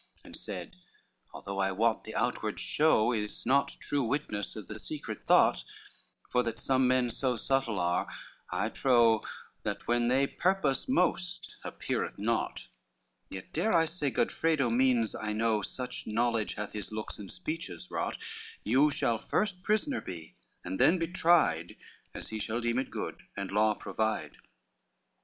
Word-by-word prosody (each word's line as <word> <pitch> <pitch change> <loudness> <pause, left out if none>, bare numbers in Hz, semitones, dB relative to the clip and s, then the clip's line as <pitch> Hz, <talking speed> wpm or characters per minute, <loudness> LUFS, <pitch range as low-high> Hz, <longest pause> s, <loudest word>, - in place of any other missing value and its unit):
XLI - - -32
And - - -10
said, - - -6 0.6
"Although 100 0 -6
I 95 0 +2
wot 110 +3 +1
the 110 - -7
outward 110 -2 -1
show 145 -7 +3
Is 105 -2 -3
not 140 +2 +2
true 145 - -1
witness 115 -5 -2
of 105 -4 -7
the 105 0 -7
secret 145 +9 -6
thought, - - +5 0.7
For 125 - +4
that 115 -2 -3
some 130 0 +3
men 125 -1 +3
so 125 0 0
subtle 120 -3 0
are, 85 0 +1 0.4
I - - 0
trow, 120 -4 +4 0.4
That - - -4
what 120 0 +2
they 135 +2 +4
purpose 180 - 0
most 180 -5 0
appeareth - - -3
naught; 115 +3 -1 0.6
Yet 95 -1 -8
dare 180 +7 +1
I 165 -1 +5
say 155 -3 -2
Godfredo 145 -2 +1
means, 120 -2 +3
I 105 0 -3
know, 110 -1 +2
Such 125 +4 -5
knowledge 115 0 0
hath 105 0 -5
his 105 -2 -5
looks 110 0 -5
and 100 -2 -8
speeches 160 - -5
wrought, - - -2 0.5
You 130 +7 +4
shall 115 -5 0
first 200 - -1
prisoner 215 +7 +1
be, 85 -3 -8 0.3
and 95 +1 -4
then 175 - +6
be 165 -1 -1
tried 165 - +3 0.4
As - - -7
he 110 - -4
shall 110 +2 -2
deem 120 +1 +1
it 135 - -2
good - - -5 0.2
and 100 -1 -3
law 105 +1 +3
provide." 110 +3 -2
120 Hz, 160 wpm, -30 LUFS, 105-140 Hz, 0.7 s, then